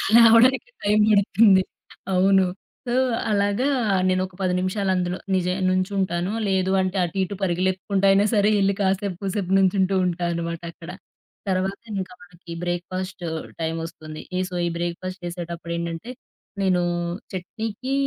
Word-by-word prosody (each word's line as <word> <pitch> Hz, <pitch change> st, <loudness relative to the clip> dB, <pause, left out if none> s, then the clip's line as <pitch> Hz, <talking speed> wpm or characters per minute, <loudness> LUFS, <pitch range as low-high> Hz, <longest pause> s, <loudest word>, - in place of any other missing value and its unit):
లేవడానికి 235 Hz, -, +6 dB
టైం 210 Hz, +1 st, +3 dB
బడుతుంది. 200 Hz, -1 st, +5 dB, 0.5 s
అవును. 190 Hz, +1 st, +4 dB, 0.4 s
సో, 240 Hz, -, -1 dB, 0.4 s
అలాగా 205 Hz, +6 st, +1 dB, 0.4 s
నేనొక 185 Hz, 0 st, 0 dB
10 185 Hz, -1 st, +1 dB
నిమిషాలు 190 Hz, +1 st, -1 dB
అందులో 180 Hz, 0 st, -1 dB, 0.2 s
నిజ 180 Hz, -1 st, 0 dB, 0.2 s
నుంచుంటాను. 185 Hz, -1 st, 0 dB, 0.2 s
లేదు 190 Hz, -1 st, +1 dB
అంటే, 185 Hz, +1 st, -2 dB
అటు 175 Hz, +2 st, -4 dB
ఇటు 195 Hz, +2 st, -4 dB
పరుగులెత్తుకుంటా 190 Hz, +2 st, 0 dB
అయినా 200 Hz, +1 st, +4 dB
సరే 205 Hz, 0 st, +4 dB
ఎళ్లి 195 Hz, 0 st, +3 dB
కాసేపు 195 Hz, -1 st, 0 dB
కూసేపు 190 Hz, -1 st, -2 dB
నుంచుంటూ 190 Hz, 0 st, +2 dB
ఉంటా 175 Hz, 0 st, -1 dB
అనమాటక్కడ. 170 Hz, 0 st, -6 dB, 0.6 s
తర్వాత 190 Hz, +1 st, -1 dB, 0.2 s
ఇంకా 185 Hz, 0 st, -8 dB
మనకి 175 Hz, -1 st, -14 dB
బ్రేక్‌ఫాస్ట్ 180 Hz, +1 st, -4 dB, 0.4 s
టైమొస్తుంది. 160 Hz, -1 st, -5 dB, 0.2 s
ఈ -, -, +1 dB
సో, 180 Hz, -, -7 dB
ఈ -, -, 0 dB
బ్రేక్‌ఫాస్ట్ 180 Hz, +2 st, -4 dB
చేసేటప్పుడేండంటే 170 Hz, +3 st, -5 dB, 0.5 s
నేనూ 185 Hz, -2 st, +2 dB, 0.5 s
చట్నీకి 220 Hz, +7 st, -4 dB
185 Hz, 125 wpm, -23 LUFS, 175-200 Hz, 0.6 s, లేవడానికి